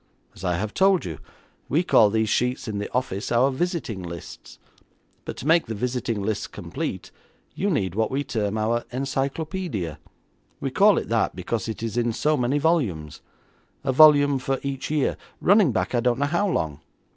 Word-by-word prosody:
As - - -13
I 90 -2 +1
have 105 +3 -3
told 190 -1 +3
you, 80 -5 -6 0.5
we 160 +5 +2
call 110 - +5
these 110 +1 +1
sheets 125 +4 0
in 105 -2 -3
the 105 - -5
office 110 -5 -2
our 125 +3 +3
visiting 145 - -2
lists, 85 -2 -9 0.7
but - - -6
to - - -7
make 165 +1 +4
the 110 - -4
visiting 120 -2 -2
lists 105 0 -2
complete - - -5 0.4
you 200 - -1
need 95 - 0
what 110 +2 0
we 140 +2 -1
term 105 -5 -2
our 115 +2 0
encyclopaedia. 135 - -3 0.6
We - - -3
call - - +5
it - - -2
that - - +1
because 115 -1 -3
it 110 - -5
is 115 +1 -3
in 120 -1 +1
so 150 +6 +1
many 125 +1 +1
volumes; 125 - 0 0.6
a 135 - +1
volume 145 -1 +6
for 135 +1 -1
each 135 -1 -4
year, 150 -3 0 0.2
running 200 -6 +4
back 110 - -1
I 120 - +2
don't 120 0 +1
know 145 - +1
how 175 +7 +1
long. 75 - -2
125 Hz, 180 wpm, -24 LUFS, 110-145 Hz, 0.7 s, volume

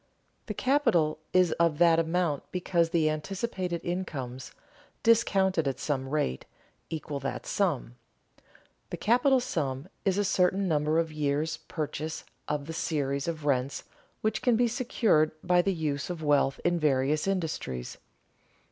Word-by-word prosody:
The - - -4
capital 175 - +2
is 185 -2 +4
of 165 -3 +3
that 165 -1 +5
amount 165 -3 0
because 175 -2 +1
the 165 -2 +2
anticipated 180 +3 -2
incomes, 135 -9 -4 0.5
discounted 190 -8 +3
at 135 - -2
some 135 -3 -2
rate, 135 - -1 0.5
equal 150 -3 -4
that 135 0 -4
sum. 145 - -1 0.9
The - - -4
capital 255 +4 +3
sum 145 - -3
is 195 -1 +1
a 205 - +2
certain 190 +1 +2
number 155 -1 +1
of 165 -1 +1
years' 150 +2 -1
purchase 155 0 -5 0.2
of 150 -1 -2
the 165 - -6
series 140 -3 -1
of 160 -3 -4
rents 135 -1 0 0.4
which 215 - 0
can 245 -2 +3
be 240 +1 +3
secured 225 - +2
by 180 0 +4
the 195 - 0
use 155 -5 -2
of 170 -3 -5
wealth 145 -2 +2
in 175 0 +2
various 150 +2 +1
industries. 160 - -3
160 Hz, 140 wpm, -28 LUFS, 145-185 Hz, 0.9 s, that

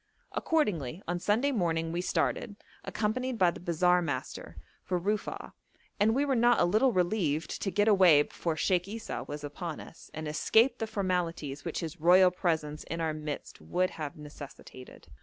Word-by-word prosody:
Accordingly, 190 - -1
on 175 +1 -1
Sunday 225 +10 +1
morning 165 -7 0
we 175 +1 -1
started, 205 +3 -1 0.3
accompanied 250 +3 -2
by 180 -4 +4
the - - -10
bazaar 180 +1 +2
master, 130 - -5 0.3
for 180 - -1
Rufa'a, 205 +4 -3 0.5
and 220 +3 +3
we 280 +2 +2
were 275 - +1
not 240 0 +4
a - - +4
little 215 +9 +3
relieved 175 -5 0
to 195 - -1
get 205 +2 +1
away 185 -8 +6
before 165 +2 -3
Sheikh 180 +3 +1
Esau 215 - -5
was 145 0 -6
upon 155 +2 -5
us, - - -13
and 155 0 -6
escape 225 - +3
the 225 - -2
formalities 175 -8 -2
which 165 - -3
his 165 0 -6
royal 180 +2 +6
presence 160 -4 -2
in 165 - -5
our 160 -1 0
midst 150 -1 -6
would 185 +1 0
have 150 -2 -6
necessitated. 145 -3 -11
175 Hz, 170 wpm, -30 LUFS, 155-210 Hz, 0.5 s, away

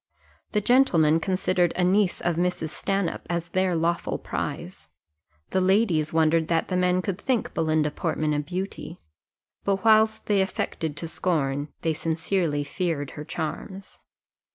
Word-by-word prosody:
The 210 - +2
gentlemen 175 - +4
considered 185 -1 +1
a 180 - +1
niece 190 +1 +2
of 175 -1 0
Mrs. 175 -2 -1
Stanhope 195 +3 -2
as 170 -1 -2
their 185 -1 +1
lawful 170 +1 0
prize. 80 +1 -5 0.6
The 190 - +2
ladies 185 -5 +2
wondered 160 0 +3
that 165 -1 0
the 185 - -1
men 180 0 +2
could 195 0 -3
think 255 -4 -1
Belinda 155 -2 +1
Portman 155 -1 -1
a 150 - 0
beauty; 180 +2 -5 0.6
but 195 +1 -1
whilst 220 0 +4
they 205 -2 +2
affected 160 -5 -3
to 165 - -3
scorn, 145 -5 -1 0.2
they 160 - +1
sincerely 165 -1 -1
feared 145 -2 -2
her 150 - -7
charms. 185 +6 -6
175 Hz, 145 wpm, -25 LUFS, 160-190 Hz, 0.6 s, gentlemen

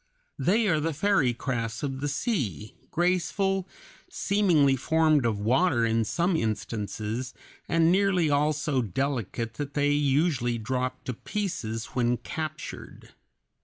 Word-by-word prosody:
They 215 +4 +2
are 160 -5 +2
the 160 0 -1
fairy 190 -7 +3
crafts 115 0 -3
of 135 -2 -3
the 145 - 0
sea, 135 - -2 0.2
graceful, 185 +2 0 0.4
seemingly 170 -9 +3
formed 155 -1 +3
of 110 -3 0
water 120 - +2
in 115 0 +1
some 175 - +1
instances, 110 +1 -3 0.3
and 165 0 +4
nearly 190 -3 +3
all 145 +1 +3
so 150 -3 0
delicate 115 0 -2
that 145 -1 -5
they 145 0 +2
usually 140 -4 +1
drop 125 +3 -3
to 125 - -3
pieces 120 - -3
when 120 -1 +1
captured. 155 +3 -7
140 Hz, 130 wpm, -27 LUFS, 120-170 Hz, 0.4 s, and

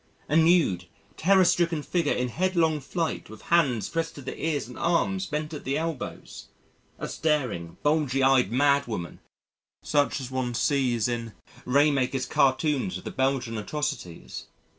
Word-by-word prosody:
A 150 - 0
nude, 160 - +4 0.3
terror 190 +2 +4
stricken 170 -3 +2
figure 170 -3 0
in 125 0 0
headlong 165 0 +1
flight 165 +4 -3
with 110 0 -12
hands 135 -10 +3
pressed 165 0 -3
to 140 - -9
the 130 - -5
ears 155 -6 -1
and 125 - -11
arms 190 +3 +1
bent 150 +1 -3
at 150 - -6
the 135 +2 -1
elbows 160 -4 -5 0.5
a - - -5
staring, 125 - -1
bulgy 145 -3 +2
eyed 130 -6 +4
mad 140 +2 +3
woman 90 -7 -5 0.6
such 145 -1 +1
as 130 -1 -7
one 130 -2 -2
sees 125 -4 +1
in 115 -2 -3 0.3
Raemakers' 135 -1 +2
cartoons 145 +5 +1
of - - -11
the - - -5
Belgian 130 -4 -1
atrocities. 95 - -5
140 Hz, 150 wpm, -26 LUFS, 125-160 Hz, 0.6 s, nude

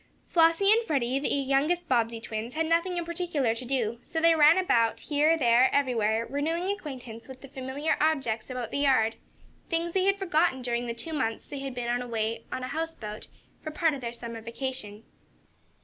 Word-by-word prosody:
Flossie 335 +4 +4
and 455 +2 +4
Freddie, 265 -4 0
as - - -2
the - - -1
youngest 280 +6 +1
Bobbsey 230 -3 +1
twins, 225 +2 -6
had 320 +1 +1
nothing 335 +2 +1
in 345 - -2
particular 330 -8 -1
to 230 - -6
do, 235 -3 -1
so 325 - -3
they 330 +1 +5
ran 310 +2 +6
about, 235 -12 +2
here, 305 +2 +2
there, 245 -2 +4
everywhere, 230 -5 +1
renewing 325 +8 -1
acquaintance 250 - -9
with 260 -1 -11
the 275 - -10
familiar 270 +3 -2
objects 270 -8 0
about 250 -3 -4
the - - -1
yard 255 -6 +3 0.6
things 335 0 -1
they 375 +1 +1
had 395 0 +3
forgotten 335 -7 +1
during 240 0 -1
the 235 - -3
two 315 +8 -5
months 225 -7 -2
they 280 - -6
had 270 -2 -5
been 245 0 -1
away 230 -2 -2
on 255 - -4
a 255 - -4
houseboat, 295 -9 -5 0.3
for 310 - -5
part 320 0 +1
of 275 - -6
their 235 -1 -4
summer 235 -1 -7
vacation. 230 -3 -5
270 Hz, 195 wpm, -28 LUFS, 235-325 Hz, 0.6 s, ran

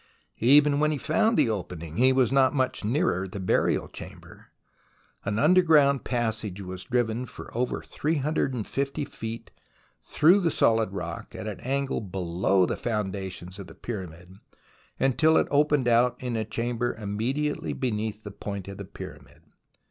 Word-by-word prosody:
Even 145 +4 +5
when 150 0 +3
he 155 - -1
found 220 - +2
the - - +4
opening, 85 -5 -6
he 130 +2 +5
was 130 -2 +3
not 135 0 +4
much 130 -4 0
nearer 110 - 0
the 95 +2 -7
burial 90 - +1
chamber. - - -11 0.8
An 100 +1 -1
underground 150 -3 +5
passage 110 -5 -2
was 95 -1 -6
driven 120 0 -1
for - - -11
over 125 +1 -1
350 140 -2 -1
feet 115 -1 -7 0.5
through 175 +7 +4
the 175 -4 +1
solid 115 -8 +2
rock 85 -4 -6
at - - -6
an 105 -4 -5
angle 140 0 -1
below 95 -1 +1
the - - -2
foundations 95 -4 -4
of 95 - -8
the - - -13
Pyramid, 90 -4 -7 0.6
until 155 +4 +4
it - - +2
opened 145 -2 +3
out 120 +1 +4
in 125 -2 -3
a 110 -1 -1
chamber 120 +2 -2
immedi 120 +9 -1
ately - - -5
beneath 110 -4 -2
the 105 - -7
point 100 -1 -6
of 100 0 -8
the 100 - -6
Pyramid. - - -11
115 Hz, 155 wpm, -26 LUFS, 100-140 Hz, 0.8 s, Even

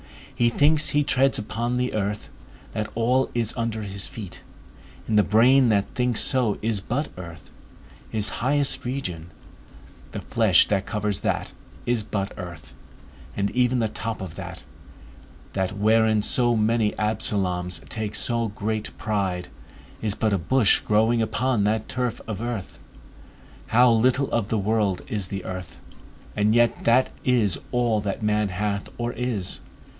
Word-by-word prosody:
He 120 -1 +3
thinks 150 +5 +3
he 145 0 +2
treads 135 -1 +3
upon 115 +3 -2
the 125 0 -1
earth, 105 0 -2 0.5
that 105 0 -2
all 125 +3 +2
is 115 -2 +2
under 115 -2 -2
his 100 -1 -5
feet, 100 -6 -9 0.7
and 110 - 0
the 105 - +7
brain 120 +5 +5
that 100 -2 +1
thinks 125 -2 +1
so 125 -6 +1
is 110 -3 0
but 135 +9 -2
earth; 85 -3 -10 0.6
his 105 -2 0
highest 140 +2 +1
region, 90 -11 -4 0.8
the - - -4
flesh - - +4
that 100 -2 0
covers 105 -2 -1
that, - - -2 0.3
is 120 -2 +1
but 100 -1 -3
earth, 85 -6 -9 0.6
and 100 0 0
even 125 0 +2
the 115 -2 +1
top 110 +1 -4
of 95 -5 -6
that, - - -8 0.9
that 95 +1 -2
wherein 110 0 +3
so 120 +1 +3
many 110 0 +2
Absaloms 95 -5 -1
take 110 -2 -3
so 115 -2 0
much 110 +1 -3
pride, 95 -4 -2 0.5
is 105 -2 -1
but 110 -2 +1
a 100 - +1
bush 110 +5 +3
growing 110 +2 +2
upon 115 0 +1
that 110 +1 0
turf 125 -2 -2
of 110 -2 -4
earth. 120 -5 -5 0.9
How 120 +2 +5
little 130 +4 +2
of 115 -4 0
the 110 - 0
world 105 -2 0
is 100 -4 -2
the 95 -1 -5
earth! 95 -1 -7 0.6
And 105 +2 +2
yet 120 0 +2
that 120 +3 +4
is 120 -7 +2
all 120 -3 +1
that 100 +2 -3
man 105 -1 +1
hath 100 +2 -2
or 120 0 -2
is. 115 -6 -3
110 Hz, 150 wpm, -24 LUFS, 100-120 Hz, 0.9 s, the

